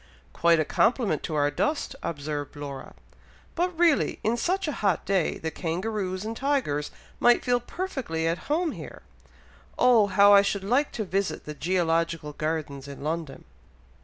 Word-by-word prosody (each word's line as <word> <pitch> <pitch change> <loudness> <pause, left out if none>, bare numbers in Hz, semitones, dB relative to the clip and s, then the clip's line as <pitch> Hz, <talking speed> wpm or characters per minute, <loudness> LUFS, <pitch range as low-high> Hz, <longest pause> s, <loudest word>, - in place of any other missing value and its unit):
"Quite 170 -1 +4
a 155 - +1
compliment 225 - +1
to 155 - -4
our 145 0 +2
dust," 295 - -1
observed 145 -2 -4
Laura. 140 -2 -8 0.6
"But 355 0 -1
really 335 -4 +3
in 225 +2 +2
such 365 +9 -1
a - - 0
hot 200 -5 +1
day, 190 -4 +1
the 160 - -4
kangaroos 185 +3 -3
and 225 +1 -4
tigers 255 - 0 0.3
might 240 0 +4
feel 245 -1 +3
perfectly 245 - -4
at 165 +9 -3
home 320 +2 +1
here. - - -9 0.7
Oh! 240 -4 +5
how 200 +1 +6
I 200 - +8
should 200 -1 -1
like 250 +9 +1
to 220 - -2
visit 195 0 -2
the 150 - -5
GEOlogical 165 -1 0
Gardens 150 -3 -3
in 140 0 -9
London!" 160 -2 -4
185 Hz, 160 wpm, -26 LUFS, 155-240 Hz, 0.7 s, I